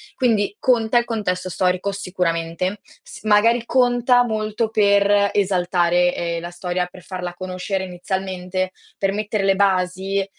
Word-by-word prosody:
Quindi 215 -6 +1
conta 240 -2 +2
il 240 - +4
contesto 185 -6 -2
storico 185 +2 0
sicuramente, 180 0 -2 0.2
s - - -12
magari 225 +3 +3
conta 245 0 +3
molto 215 -1 -2
per 200 -1 +3
esaltare, 180 -2 +2
ehm, 170 -1 -2
la 175 +1 -7
storia, 180 0 -2
per 180 0 -14
farla 180 -2 -5
conoscere 185 +1 -4
inizialmente, 185 0 -3 0.3
per 195 0 0
mettere 210 -1 -2
le 195 0 +3
basi, 190 0 +1
195 Hz, 135 wpm, -21 LUFS, 180-215 Hz, 0.3 s, il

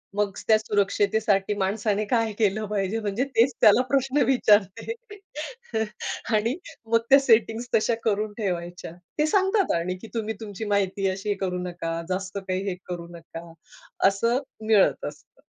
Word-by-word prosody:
मग 205 -1 +1 0.2
त्या 220 -1 +6
सुरक्षतेसाठी 205 -1 +1
माणसाने 205 +2 0
काय 225 0 +1
केलं 215 0 +1
पाहिजे? 200 +1 -1
म्हणजे 210 +3 -1
तेच 240 +4 +4
त्याला 210 +4 +7
प्रश्न 275 +1 +2
विचारते. 210 - +3 1.4
आणि 225 +5 +1 0.4
मग 230 - +6
त्या 275 +1 +8
सेटिंग्स 230 -2 +2
तशा 225 +2 +2
करून 210 -1 0
ठेवायच्या. 175 -5 -4 0.3
ते 300 - +4
सांगतात 385 +3 +2
आणि 175 +2 -1 0.2
तुम्ही 220 -1 -2
तुमची 215 0 -6
माहिती 195 0 +1
अशी 195 +2 -2
करू 180 -1 -1
नका, 170 -2 -4
जास्त 185 +1 -3
काही 185 +1 -1
हे 185 - -3
करू 175 -1 -5
नका. 165 0 -10 0.6
असं 230 +5 +2 0.3
मिळत 210 -3 +4
असतं. - - -10
210 Hz, 140 wpm, -25 LUFS, 190-225 Hz, 1.4 s, त्या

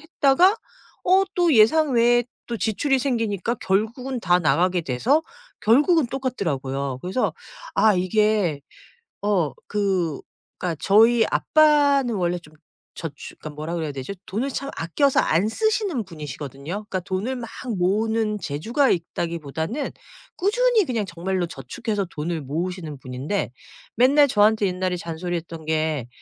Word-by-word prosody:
했다가 320 +5 +3 0.5
어 380 +2 +5
또 350 -3 +3
예상외에 240 -1 +4 0.2
또 235 - -3
지출이 265 +6 +1
생기니까 230 -5 -1
결국은 235 +7 -1
다 180 -2 +3
나가게 180 +2 +2
돼서 230 - +1 0.4
결국은 290 - +4
똑같더라고요. 140 - -3
그래서 190 +8 0 0.4
아 215 -2 +4
이게 185 -4 +1 0.6
어 195 -8 +1
그 190 -7 0 0.4
그러니까 180 -3 -2
저희 225 +3 +5
아빠는 285 -5 +3
원래 175 -2 0
좀 155 -3 -18 0.4
저추 150 -4 -7
그러니까 150 -1 -8
뭐라 155 +3 -4
그래야 160 -3 -2
되죠 135 +7 -6
돈을 235 +8 -2
참 275 +1 -4
아껴서 270 - +2
안 170 +6 +2
쓰시는 405 - 0
분이시거든요. 145 -3 -8 0.2
그러니까 185 - -2
돈을 195 +8 -3
막 235 -3 -6 0.3
모으는 215 +3 +1
재주가 225 - 0
있다기보다는 165 - -2 0.5
꾸준히 445 +2 +3
그냥 230 -7 -1
정말로 180 +1 -2
저축해서 200 - -4
돈을 160 0 -3
모으시는 160 +2 -4
분인데 130 +6 -3 0.4
맨날 280 +5 +5
저한테 210 -1 +3
옛날에 185 0 -1
잔소리했던 165 -1 -5
게 155 -5 -1
200 Hz, 315 characters per minute, -23 LUFS, 165-250 Hz, 0.6 s, 어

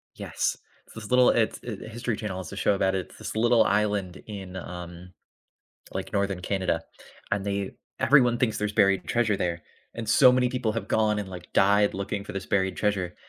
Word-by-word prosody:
Yes, - - -2 0.4
this 110 -2 -8
little, 125 0 +6
it's 115 -2 +1
it 110 -5 -6
the - - -8
History 115 0 -3
Channel 105 -3 -5
has 95 -2 -7
a - - -6
show 100 - +2
about 95 -1 +1
it's 95 -2 -5
this - - -6
little 115 0 +4
island 105 -3 0
in, 95 -3 -7
um, 90 0 -8 0.8
like, - - -5
Northern 100 -2 0
Canada, 95 -3 -1 0.5
and 100 -1 0
they 100 -1 -2 0.3
everyone 125 -4 +5
thinks 115 -3 0
there's 105 0 -1
buried 100 -3 +3
treasure 115 -4 +1
there, 85 -3 -2 0.3
and 115 -2 -6
so 125 +3 +7
many 125 0 +2
people 125 -4 -1
have 110 -2 -4
gone 110 -1 +2
and, 100 -2 -4
like, 90 -2 -10
died 100 +1 +4
looking 100 +1 -3
for - - -7
this 95 -1 -4
buried 95 -2 0
treasure, 95 -4 -1
100 Hz, 195 wpm, -26 LUFS, 95-110 Hz, 0.8 s, so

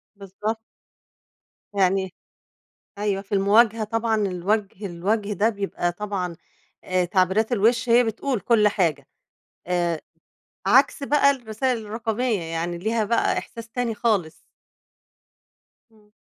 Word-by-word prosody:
بالضبط. 205 +3 -4 1.2
يعني 190 -1 +1 0.8
أيوه. 200 -1 -1
في 200 - -22
المواجهة 215 +3 +4
طبعًا 225 +1 0
الوجه 200 +1 -1
الوجه 200 +4 -1
ده 205 +3 +2
بيبقى 200 -4 -2
طبعًا 185 -2 -4 0.5
آآ 185 -1 +1
تعبيرات 190 +5 +1
الوِش 235 +2 +2
هي 240 +1 +6
بتقول 235 +2 -2
كل 215 +1 +3
حاجة، 165 -9 0 0.6
آآ 175 -2 0 0.6
عكس 265 +7 +4
بقى 280 0 +4
الرسايل 245 -1 -2
الرقمية. 225 0 -1
يعني 165 +1 -3
ليها 220 +5 0
بقى 230 +2 +1
إحساس 230 0 -7
تاني 235 -1 -2
خالص. 200 -8 0 1.6
إمم. 210 -1 -25
210 Hz, 110 wpm, -24 LUFS, 185-230 Hz, 1.6 s, هي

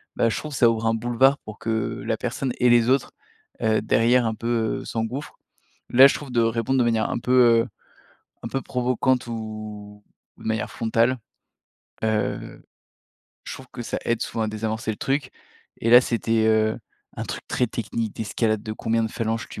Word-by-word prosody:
bah, 115 - +2
je - - -2
trouve 150 -1 -6
ça 120 -3 +5
ouvre 115 0 -1
un 115 - +3
boulevard 120 +4 +3
pour 110 0 -11
que 110 -1 -2
la - - 0
personne 130 -3 -3
et 125 - +4
les 120 0 +5
autres, 135 0 +2 0.5
heu, 110 -1 +2
derrière 120 +2 +3
un 110 -1 -1
peu 115 0 -1
s'engouffrent. 115 +6 -4 0.5
Là 130 +3 +8
je - - 0
trouve 140 -3 -7
de 120 -1 +2
répondre 115 +3 +1
de - - +4
manière 115 -2 +1
un - - -2
peu, 125 - -3 0.3
heu, - - -7 0.8
un - - -3
peu 135 - -2
provocante 125 0 0
ou 110 -2 -7 0.3
de - - -15
manière 110 -1 -1
frontale, 115 +3 +1 0.9
heu, 110 -1 -2 0.8
je - - -6
trouve 130 - -11
que 120 -2 -6
ça - - -3
aide 115 -1 0
souvent 115 - -3
à - - -1
désamorcer 110 +1 -3
le - - -8
truc. 140 +5 -1 0.5
Et 115 - +1
là 120 +1 +10
c'était, 115 -2 0
heu, 110 0 +2 0.4
un - - -3
truc - - -5
très 125 - +1
technique, 115 -1 -4
d'escalade 110 0 -1
de 110 -1 -5
combien 115 +1 0
de 110 - -3
phalanges 115 0 -2
tu - - -8
115 Hz, 185 wpm, -24 LUFS, 110-125 Hz, 0.9 s, là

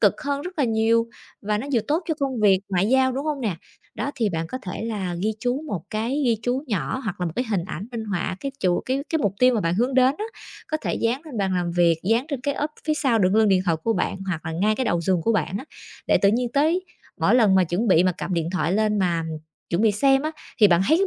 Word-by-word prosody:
cực - - +3
hơn 285 -1 -1
rất 360 -2 -8
là 275 - +3
nhiều 230 0 +2 0.4
và 210 0 0
nó 265 - -5
vừa 235 - +3
tốt 320 +5 +1
cho 320 - +1
công 265 -5 -1
việc 195 -3 +5
ngoại 190 +1 +1
giao, 260 0 +3
đúng 275 +3 -3
hông 300 -3 -2
nè? 205 -8 -1 0.4
Đó, 285 - -2
thì 230 -6 0
bạn 165 -2 -2
có 255 - -5
thể 180 +3 -5
là 195 -6 -3
ghi 215 - +1
chú 250 +4 -1
một 180 - -4
cái 235 +7 -1
ghi 230 -2 +3
chú 250 +4 -1
nhỏ 205 - -2
hoặc 190 -3 -4
là 175 - 0
một 160 - -4
cái 250 - 0
hình 185 -5 0
ảnh 190 +3 -6
minh 225 -2 -4
họa 185 -2 -2
cái 275 -1 -4
chủ 180 -1 +2
cái 265 +2 0
cái 320 - 0
mục 205 -7 0
tiêu 255 -1 +5
mà 220 - +1
bạn 170 -1 0
hướng 245 +5 0
đến 260 +1 +4
á, 425 - -2 0.4
có 310 - 0
thể - - -1
dán 245 +6 -1
lên 265 -9 -7
bàn 190 -2 0
làm 175 -1 -1
việc, 170 -2 +3
dán 230 +6 +2
trên 280 -4 -3
cái 285 +1 -1
ốp 295 +1 -2 0.2
phía 310 - +2
sau 260 -7 +1
đựng 185 0 +2
lưng 220 -1 +4
điện 185 -1 +3
thoại 165 -3 +2
của 225 - +2
bạn, 195 - -1
hoặc 165 -3 -3
là 160 - -3
ngay 205 +6 +1
cái 260 - -1
đầu 170 - +1
giường 175 0 +1
của 230 - +2
bạn 190 -1 -1
á, 265 - -8 0.4
để - - +4
tự 200 - +6
nhiên 240 +3 +1
tới 320 +6 +2 0.4
mỗi - - +4
lần 215 -6 +5
mà 185 -1 +5
chuẩn 185 +7 -1
bị 180 -1 +5
mà 185 - +3
cầm 180 - -3
điện 165 -1 -1
thoại 180 -2 0
lên 210 0 +1
mà 170 -3 +1 0.5
chuẩn 170 +5 +1
bị 215 -2 +4
xem 270 +6 +3
á, 310 - -1 0.3
thì 210 - +8
bạn 170 0 +4
thấy 320 - +5
cái 390 - +2
220 Hz, 285 wpm, -23 LUFS, 185-260 Hz, 0.5 s, thì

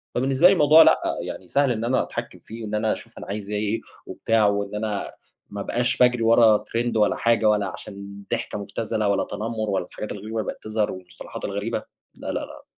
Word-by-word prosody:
فبالنسبة 135 +6 +4
لي 195 - +6
الموضوع 155 -2 +7
لأ، - - +5 0.3
يعني 95 - -7
سهل 140 +2 +2
إن 115 -1 -2
أنا 130 +2 +2
أتحكم - - -6
فيه 115 +1 -9
وإن 105 0 -3
أنا 110 0 +1
أشوف - - -11
أنا - - -8
عايز 100 0 -5
إيه 105 +1 -1 0.3
وبتاع، 115 -2 +1
وإن 100 0 -1
أنا 105 -1 -3 0.4
ما 100 0 -5
أبقاش 125 +4 0
باجري 125 -2 +4
ورا 115 -1 +6
ترند 115 +1 -2
ولا 105 - +3
حاجة، 115 -2 +3
ولا 105 -1 +2
علشان 100 +2 -9
ضحكة - - -2
مبتذلة، 110 +1 -2
ولا 100 - +2
تنمر، 110 0 -4
ولا 95 -3 0
الحاجات 105 - -7
الغريبة 110 +2 -5
اللي - - 0
بقت - - -25
تظهر، 110 -1 -1
والمصطلحات 90 -1 -9
الغريبة، 100 +3 -3 0.3
لا - - -10
لا - - -1
لا. - - -10
110 Hz, 200 wpm, -24 LUFS, 100-115 Hz, 0.4 s, الموضوع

